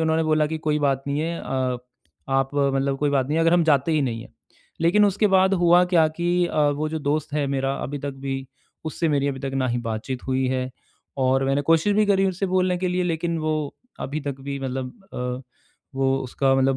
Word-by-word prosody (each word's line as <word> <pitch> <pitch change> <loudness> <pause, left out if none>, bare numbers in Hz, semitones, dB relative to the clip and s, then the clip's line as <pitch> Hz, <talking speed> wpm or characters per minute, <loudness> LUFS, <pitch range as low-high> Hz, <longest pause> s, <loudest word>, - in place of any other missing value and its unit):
उन्होंने 160 0 +2
बोला 155 -1 +2
कि 160 +1 -3
कोई 150 -1 0
बात 135 -2 +1
नहीं 140 +1 0
है 165 +1 -2
अ, 130 -1 -1 0.5
आप 135 0 +1
मतलब 140 -1 +1
कोई 145 0 +1
बात 135 -2 +1
नहीं 155 - 0
है, 165 - +3
अगर 165 +1 +4
हम 175 -2 +4
जाते 150 +1 +3
ही 150 -2 +2
नहीं 115 -3 -2
हैं। - - -15 0.5
लेकिन 180 +5 +5
उसके 205 +1 +2
बाद 190 +1 +5
हुआ 175 0 +5
क्या 160 -2 +6
कि 175 0 +1
अ, 155 - -1
वो 150 +2 -2
जो 160 - -2
दोस्त 145 +1 -1
है 145 -2 +1
मेरा 135 0 0
अभी 145 +2 -4
तक - - -1
भी 135 -1 -3 0.4
उससे 160 +1 -1
मेरी 140 -1 +1
अभी 135 -1 -4
तक 135 -1 -4
न 130 -2 0
ही 120 - 0
बातचीत 115 +3 -4
हुई 130 0 +1
है 130 0 -1 0.6
और 135 +1 +2
मैंने 135 +1 +1
कोशिश 165 +5 +4
भी 215 -1 +4
करी 195 -1 +3
उससे 190 +1 -2
बोलने 185 0 +1
के 185 0 -1
लिए, 180 0 0
लेकिन 170 0 -1
वो 155 -2 -2 0.3
अभी 150 +3 -4
तक 140 -2 -5
भी 140 0 -4
मतलब 130 -1 -4 0.2
अ, 125 +1 -3 0.6
वो 135 0 +2
उसका 135 +1 +1
मतलब 135 0 +2
145 Hz, 225 wpm, -24 LUFS, 135-165 Hz, 0.6 s, क्या